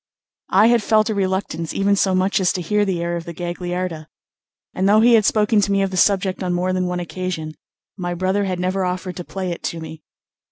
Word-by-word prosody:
I 200 +3 +5
had 235 0 +4
felt 215 +1 +2
a - - 0
reluctance 190 -4 -2
even 200 +1 +2
so 190 -1 +2
much 190 +2 +1
as 185 -2 +2
to 180 - -3
hear 210 +4 +1
the 180 -3 -1
air 170 0 -2
of 170 -1 -5
the 170 - -8
Gagliarda, 175 -2 -4 0.7
and 190 +2 +1
though 215 +1 +5
he 235 +1 +5
had 220 -3 +5
spoken 210 0 +3
to 200 - 0
me 195 0 +2
of 195 - -2
the - - -4
subject 190 0 +2
on 180 -1 -1
more 180 +1 0
than 185 -1 0
one 180 0 -2
occasion, 175 -3 -4 0.4
my 175 -2 -3
brother 190 +3 0
had 185 -2 -2
never 185 +1 -1
offered 180 0 -3
to 175 - -5
play 185 0 -4
it 170 - -6
to 170 - -3
me. 160 -1 -9
185 Hz, 235 wpm, -20 LUFS, 175-200 Hz, 0.7 s, I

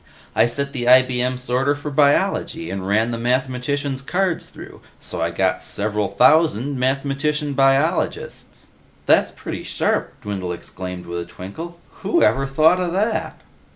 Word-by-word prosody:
I - - +4
set 140 +4 -3
the 125 -3 -3
IBM 125 0 +4
sorter 130 +3 0
for 145 +1 -6
Biology, 160 +3 +1
and 95 -1 -4
ran 110 +4 +2
the 115 - -3
mathematicians' 130 +3 -1
cards 180 +4 -1
through. - - -12 0.2
So - - -5
I - - +1
got - - 0
several 105 0 -1
thousand 145 -3 +3
mathematician 140 +3 -1
biologists." 135 +3 0 0.4
"That's - - +4
pretty - - -6
sharp!" - - -2
Dwindle 95 -4 -3
exclaimed 90 +1 -7
with 85 0 -4
a 85 - -5
twinkle. 130 - -9 0.2
"Whoever 135 - +2
thought 155 +6 +4
of 175 -2 -1
that!" 215 +4 -1
135 Hz, 140 wpm, -21 LUFS, 115-150 Hz, 0.4 s, I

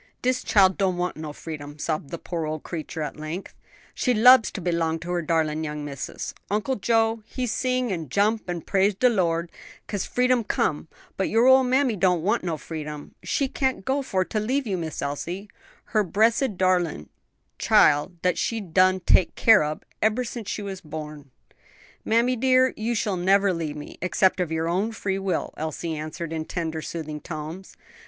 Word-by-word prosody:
"Dis 255 0 +1
chile 190 -2 +5
don't 190 -3 0
want 180 0 -1
no 155 -1 -6
freedom," 145 -1 -8
sobbed 155 -2 -3
the 170 - -5
poor 165 -2 -4
old 155 0 -4
creature 160 -1 -5
at 150 - -5
length, 155 +5 -6 0.4
"she 250 -2 +1
lubs 250 +1 +7
to - - -6
b'long 170 -2 0
to 175 +1 -5
her 175 -1 0
darlin' 160 -1 0
young 150 -1 -4
missis: 140 -2 -5 0.2
Uncle 215 +6 0
Joe 225 +2 +1
he 255 - -3
sing 255 0 0
an' 165 -6 -4
jump 205 - +1
an' 175 -1 -3
praise 195 +4 +2
de 250 +6 +4
Lord, 170 -6 0 0.3
'cause 205 -3 -3
freedom 250 -1 +2
come, 155 -6 -1 0.3
but 190 - 0
your 225 +2 +3
ole 260 0 +7
mammy 255 -1 +2
don't 180 -3 +2
want 195 - +1
no 170 -3 -2
freedom; 150 -1 -7
she 275 - 0
can't 260 -6 -1
go 275 +2 +1
for 190 -8 0
to 215 - -2
leave 260 +6 0
you, 200 -4 -1
Miss 160 -5 -4
Elsie, 170 +8 -4 0.5
her 215 -1 +4
bressed 220 +3 +2
darlin' 180 - +1 0.5
chile 145 0 +5 0.2
dat 180 -1 +1
she 230 - -1
been 185 -6 -10
done 185 +1 +4
take 175 - +3
care 225 -7 +6
ob 150 +1 -4 0.2
ever 220 +4 +2
since 230 -4 -6
she 210 - -3 0.2
born." 150 -2 -8 0.7
"Mammy 235 +3 +2
dear, 255 +1 +3
you 230 +2 -2
shall 205 -3 0
never 195 +2 +3
leave 160 -3 -3
me 150 - -9
except 185 +1 +2
of 175 -3 -1
your 160 0 -1
own 195 +7 0
free 195 -2 -2
will," 195 -2 -2
Elsie 160 +1 -3
answered, 155 +2 -5
in 160 -1 -3
tender 160 -2 -3
soothing 155 -2 -6
tones. 160 +3 -7
185 Hz, 185 wpm, -25 LUFS, 160-220 Hz, 0.7 s, lubs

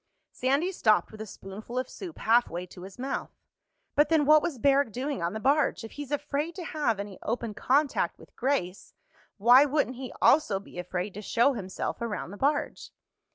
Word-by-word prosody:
Sandy 280 +8 0
stopped 215 - +2
with 215 - -10
a 220 - -6
spoonful 210 +5 -9
of 255 0 -1
soup 350 +2 -9
halfway 220 -6 +2
to 180 0 -13
his 190 +1 -10
mouth. 265 +2 -3 0.6
"But 295 0 +3
then 315 -3 +3
what 305 +1 +7
was 295 -5 -3
Barrack 275 -1 +3
doing 260 -2 -3
on 170 +2 -1
the 220 - -4
barge? 280 +1 +2
If 225 - -8
he's 290 -2 -7
afraid 295 +3 -2
to 370 - -6
have 285 -10 -1
any 200 -2 -7
open 230 -1 -3
contact 280 +6 +1
with - - -18
Grace, 240 -9 -2 0.4
why 245 +6 +7
wouldn't 280 -3 0
he 260 -1 -6
also 270 -10 +4
be 195 -2 -11
afraid 180 +2 -4
to 210 - -7
show 240 +6 +2
himself 190 -2 -4
around 220 -5 -4
the 205 - -9
barge?" 290 +5 -1
250 Hz, 190 wpm, -28 LUFS, 210-290 Hz, 0.6 s, what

